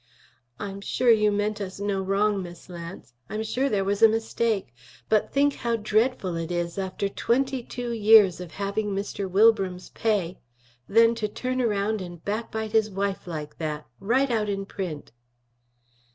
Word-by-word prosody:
"I'm 200 -1 -5
sure 240 +4 +2
you 210 -2 +4
meant 205 +1 -1
us 190 -1 -6
no 200 -1 -1
wrong, 200 +1 +1
Miss 175 0 -10
Lance; 170 -7 -9 0.2
I'm 215 +2 -3
sure 250 +5 0
there 200 -5 +1
was 200 +1 -1
a 225 - +10
mistake. 225 - -1 0.4
But 215 -1 +2
think 285 +1 +3
how 235 -1 0
dreadful 215 -3 0
it 165 +1 -4
is, 175 +1 -2
after 190 +1 -2
twenty 255 +5 0
two 240 0 -5
years 210 -5 +6
of 175 -3 -9
having 200 +1 -2
Mr. 200 -1 -3
Wilbram's 195 -2 +3
pay, 200 -6 -1 0.5
then 230 +2 +5
to 225 -2 -2
turn 255 +4 -2
around 210 -2 0
and 175 -2 -9
backbite 220 +1 -3
his 220 -1 +3
wife 195 -1 -3
like 150 -3 -6
that, 155 -2 -3
right 250 +6 +2
out 215 -3 0
in 195 -1 -2
print!" 180 -7 -6
205 Hz, 165 wpm, -26 LUFS, 190-225 Hz, 0.5 s, a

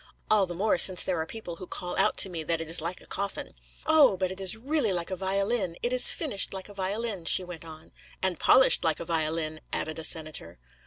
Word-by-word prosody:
'All 205 -3 +4
the 175 - -7
more 195 0 0
since 185 -2 +6
there 175 -3 -2
are 160 - -6
people 180 -6 -7
who 185 - -10
call 180 - -5
out - - +2
to - - +6
me 170 -3 -6
that 165 +1 -2
it 165 - -6
is 165 0 +3
like 170 +3 -5
a - - -17
coffin.' 200 0 -5 0.3
'Oh! 300 -10 +4
but 185 0 -2
it 190 - -8
is 190 +3 -1
really 265 -2 0
like 175 0 -3
a - - -2
violin. 195 0 -2
It 240 - -1
is 250 0 +7
finished 260 - 0
like 190 - -7
a - - -12
violin,' 200 -1 -4
she 185 - +5
went 175 -2 -10
on. 160 -1 -13 0.3
'And 185 -3 0
polished 260 - +4
like 160 -2 0
a 170 - -7
violin,' 155 -1 -2
added 155 0 -4
a - - -7
senator. 155 - -3
185 Hz, 235 wpm, -27 LUFS, 165-200 Hz, 0.3 s, is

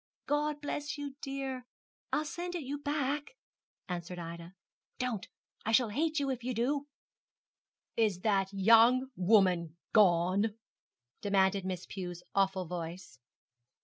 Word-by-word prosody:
'God 295 0 0
bless 295 0 -3
you, 285 -1 -5
dear. 270 -2 -4 0.5
I'll 305 - +1
send 350 +3 -4
it 335 - -3
you 280 +2 -4
back,' 290 - -2 0.5
answered 180 -1 -4
Ida. 170 +1 -7 0.4
'Don't; 245 -6 -2 0.4
I 225 - -1
shall 235 -1 +5
hate 310 +7 0
you 275 -1 0
if 250 -2 -4
you 250 0 -2
do.' 275 +5 0 1.1
'Is 210 -6 +2
that 195 -2 +2
young 230 +6 +5
woman 180 -4 +3 0.2
gone?' 200 +2 +4 0.6
demanded 195 -1 +2
Miss 185 -2 -3
Pew's 175 -2 -6
awful 195 -1 +2
voice. 175 -2 -6
220 Hz, 125 wpm, -32 LUFS, 185-275 Hz, 1.1 s, shall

